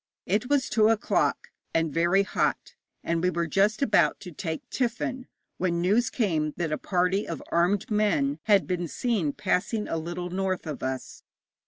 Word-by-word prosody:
It 210 +7 0
was 285 -2 +2
two 215 0 +3
o'clock, 225 -2 +1 0.3
and 165 -2 +1
very 175 +4 +3
hot, 200 - -1 0.3
and 165 0 0
we 180 - +2
were 170 -1 -1
just 205 - +2
about 175 - +3
to 180 - -8
take 160 0 -5
tiffin, 250 +1 -2 0.3
when 170 -2 0
news 210 +7 +2
came 160 - 0
that 170 -3 -2
a 155 - 0
party 180 +2 0
of 165 -4 -5
armed 185 +7 +1
men 165 -9 +1
had 205 -3 +4
been 175 -2 -2
seen 185 - 0
passing 210 +4 -1
a 165 - -2
little 175 +2 -5
north 185 -1 -1
of 150 -3 -5
us. 130 0 -4
180 Hz, 170 wpm, -27 LUFS, 165-210 Hz, 0.3 s, had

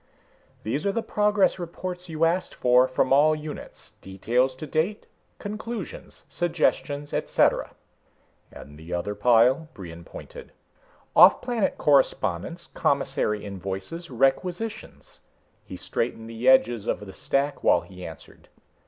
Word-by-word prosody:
"These 135 +8 -2
are - - +2
the 230 +3 -2
progress 210 -2 +2
reports 180 +1 -6
you 160 0 +1
asked 180 +3 -1
for, 125 +1 +4
from 130 +1 +1
all 155 +3 +5
units. 150 0 -9
Details 120 +7 0
to 145 - -7
date, 165 +8 -1 0.3
conclusions, 215 0 -7
suggestions, 155 -4 -1
et - - -2
cetera." - - +2 0.8
"And 75 +1 -12
the 80 +2 -5
other 100 +4 -3
pile?" 125 +8 +3
Brion 85 -3 -9
pointed. - - -11 0.6
"Offplanet 235 -5 +5
correspondence, 140 - +1
commissary 105 -6 -1
invoices, 100 - -6
requisitions." 180 - -2 0.4
He - - -9
straightened 115 - -3
the 115 +3 0
edges 120 -4 +4
of - - -1
the 95 -2 -9
stack 140 +1 -1
while - - +4
he 90 -2 -12
answered. 80 -4 -12
140 Hz, 125 wpm, -25 LUFS, 105-175 Hz, 0.8 s, all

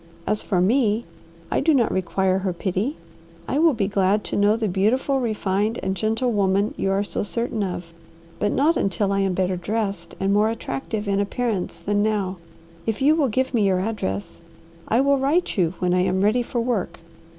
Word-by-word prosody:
As 210 - 0
for 185 - 0
me, 220 +3 +2 0.5
I - - +2
do 320 -2 +3
not 240 -4 +2
require 190 0 +1
her 190 -1 -2
pity. 195 - -2 0.5
I 280 - 0
will 320 -3 +4
be 200 -3 0
glad 200 +1 +1
to - - -4
know 205 +1 +4
the 225 -1 -1
beautiful, 225 +9 +1
refined, 215 -2 -1
and 190 0 -1
gentle 225 +5 0
woman 200 0 +1
you 195 - -1
are 195 +1 +1
so - - -3
certain 230 +1 -2
of, 180 -3 -4 0.5
but 205 - +1
not 310 +5 +2
until 195 +1 0
I 195 - +1
am 195 -2 +1
better 185 0 0
dressed 195 -3 -3
and 195 +1 +1
more 210 +2 +3
attractive 210 0 -4
in 200 0 +1
appearance 205 -1 -2
than 205 0 0
now. 205 -3 0 0.5
If 220 -1 -1
you 285 +3 +5
will 310 -3 +2
give 260 +3 -1
me 215 -4 +3
your 185 -1 +2
address, 145 - -3 0.5
I 230 +4 +3
will 280 0 +3
write 300 +7 +1
you 180 -3 +1
when 180 -1 0
I 180 - +3
am 185 +1 +1
ready 215 +4 +3
for 240 0 -3
work." 225 -7 -1
205 Hz, 195 wpm, -23 LUFS, 190-230 Hz, 0.5 s, you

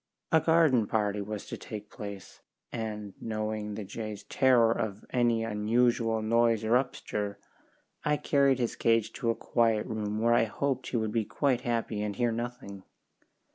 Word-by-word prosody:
A 160 - +6
garden 155 -9 +4
party 105 -2 0
was 105 0 -5
to - - -6
take 105 -1 -8
place, 100 -3 -9 0.3
and 105 -3 -5
knowing 110 -1 -3
the 110 - -5
jay's 105 +1 -6
terror 125 -4 +4
of 105 -3 -3
any 120 -2 +2
unusual 115 +1 +1
noise 115 0 +3
or 110 - -1
upstir, 105 -5 -1 0.7
I 150 0 +2
carried 140 -2 +3
his 120 -3 -1
cage 115 -1 +2
to 120 -4 -2
a 115 - +2
quiet 115 -2 +1
room 105 -1 -3
where 115 +1 +3
I 115 - +4
hoped 130 +4 -2
he 125 - -1
would 110 -1 -1
be 110 -1 0
quite 135 0 0
happy 115 -3 -1
and 105 -1 -2
hear 120 +1 +1
nothing. 120 -4 -5
115 Hz, 165 wpm, -29 LUFS, 105-120 Hz, 0.7 s, A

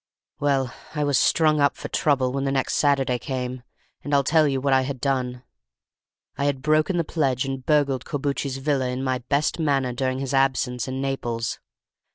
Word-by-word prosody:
"Well, 135 -4 +1 0.2
I 150 - 0
was 145 -2 +2
strung 155 -2 +3
up 140 - +2
for - - -6
trouble 135 -4 +1
when 135 0 -1
the 135 - 0
next 135 -1 0
Saturday 135 -4 +2
came, 125 -1 -4 0.4
and 145 0 0
I'll 140 - +4
tell 155 +2 +4
you 135 -2 0
what 135 0 +1
I 130 - +5
had 130 0 -4
done. 125 -2 -1 1.0
I 140 - +1
had 140 -2 -1
broken 155 +4 +2
the 170 - +2
pledge 135 -5 0
and 135 -1 -4
burgled 140 -3 +2
Corbucci's 140 -2 -2
villa 135 -1 0
in 125 +1 -3
my 130 -1 0
best 140 +7 0
manner 135 -5 +1
during 130 +1 -1
his 135 0 -3
absence 130 -2 +1
in 130 +1 -3
Naples. 120 -4 -2
135 Hz, 190 wpm, -24 LUFS, 130-145 Hz, 1.0 s, I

